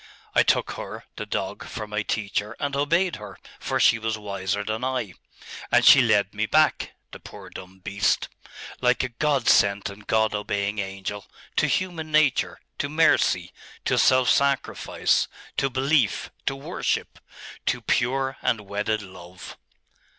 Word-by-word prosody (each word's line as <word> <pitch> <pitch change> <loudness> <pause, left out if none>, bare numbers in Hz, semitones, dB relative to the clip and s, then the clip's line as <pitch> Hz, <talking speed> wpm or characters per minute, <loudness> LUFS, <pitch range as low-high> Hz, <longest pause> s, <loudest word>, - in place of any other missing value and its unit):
I - - +5
took - - +2
her, - - -7
the - - -6
dog, - - -3
for 110 - -5
my 105 0 -2
teacher, 105 0 -2
and 140 -1 -2
obeyed 170 +6 +1
her, 105 -3 -10 0.2
for - - -2
she 115 - +5
was 110 0 -2
wiser 100 -1 -3
than 110 +3 -3
I. 125 -7 -2 0.6
And - - +4
she 135 - +9
led 105 -4 +2
me 110 +1 -1
back 155 +4 +2 0.2
the - - -10
poor - - -12
dumb 95 0 -11
beast 100 +2 0 0.5
like 125 0 +2
a 130 - -2
God 135 +1 0
sent 100 0 +3
and 100 +1 -14
God 110 -1 +2
obeying 105 0 -2
angel, 95 +1 -5 0.3
to - - +3
human 165 -4 -2
nature, 150 -3 +2 0.2
to 145 - -1
mercy, 160 +2 +2 0.3
to - - +2
self 130 -1 +4
sacrifice, 140 -1 +1 0.3
to 135 - +1
belief, 130 -2 +1 0.2
to 135 - +1
worship 135 - -3 0.5
to - - +1
pure 135 +2 0
and 110 - 0
wedded 105 +1 -2
love. 90 -1 -11
110 Hz, 150 wpm, -25 LUFS, 100-135 Hz, 0.6 s, she